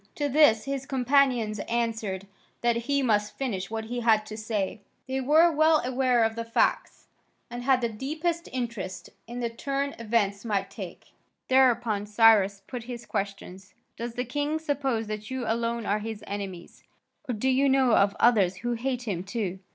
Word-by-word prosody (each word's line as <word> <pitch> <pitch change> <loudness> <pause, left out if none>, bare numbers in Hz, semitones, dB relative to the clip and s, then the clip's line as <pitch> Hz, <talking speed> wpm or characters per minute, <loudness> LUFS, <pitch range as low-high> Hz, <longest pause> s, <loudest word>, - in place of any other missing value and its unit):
To 290 - -1
this 280 -6 +4
his 275 -1 -4
companions 255 -5 +2
answered 225 -5 -2 0.4
that 240 -1 +2
he 275 +4 0
must 210 -3 +1
finish 195 -8 -3
what 220 0 -4
he 245 +2 -4
had 220 -2 +3
to 215 - -8
say; 215 -2 -3 0.3
they 265 0 -2
were 315 +6 +5
well 315 0 +4
aware 255 -2 +2
of 225 0 0
the 230 - -3
facts, 230 0 0 0.5
and 240 0 -5
had 260 0 +3
the 235 - 0
deepest 315 +9 -3
interest 230 -7 -5 0.2
in 240 +1 -6
the 235 - -1
turn 275 +4 -2
events 210 -3 0
might 200 -3 -1
take. 190 -4 -9 0.4
Thereupon 240 -5 +3
Cyrus 205 -2 +4
put 245 -3 -7
his 240 -1 -7
questions: 195 -1 -5 0.2
"Does 235 0 -6
the 250 +1 -2
king 290 +5 -1
suppose 275 -7 -1
that 215 0 -6
you 260 -1 -3
alone 230 0 -1
are 210 +1 +1
his 215 -1 -6
enemies, 195 -4 -7 0.5
or 245 - 0
do 215 +5 -1
you 270 +2 +3
know 265 -3 +4
of 200 +1 +3
others 205 -6 +4
who 240 - +1
hate 250 +1 -2
him 190 -7 -3
too?" 195 -2 -3
235 Hz, 175 wpm, -27 LUFS, 210-260 Hz, 0.5 s, were